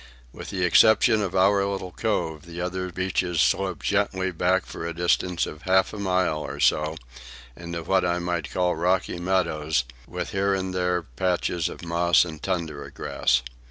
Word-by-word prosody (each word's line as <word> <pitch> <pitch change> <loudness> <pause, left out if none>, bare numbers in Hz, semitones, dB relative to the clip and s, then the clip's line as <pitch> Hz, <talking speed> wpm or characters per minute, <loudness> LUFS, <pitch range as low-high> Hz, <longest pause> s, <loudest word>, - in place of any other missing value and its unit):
With - - -8
the 95 -2 -2
exception 110 +4 +5
of 95 -2 -3
our 100 +1 +4
little 100 -2 -3
cove, 85 -7 -2
the 85 +1 -8
other 90 +1 -3
beaches 90 -2 -1
sloped 95 -1 +1
gently 95 -2 0
back 90 +2 +1
for - - -8
a 85 0 -4
distance 90 0 +1
of 75 - -9
half 95 +3 +2
a 105 - -6
mile 90 -5 +1
or - - -6
so, 80 +1 +2 0.6
into 85 -1 -6
what 95 +2 +2
I 90 0 +1
might 85 -3 -2
call 90 -1 0
rocky 90 +1 0
meadows, 80 -6 0 0.2
with - - -5
here 100 0 +1
and 95 -1 -3
there 90 -1 0
patches 85 +4 -1
of 85 - -9
moss 85 +1 +3
and 80 -2 -8
tundra 80 -7 -3
grass. 65 -2 0
90 Hz, 170 wpm, -25 LUFS, 85-95 Hz, 0.6 s, exception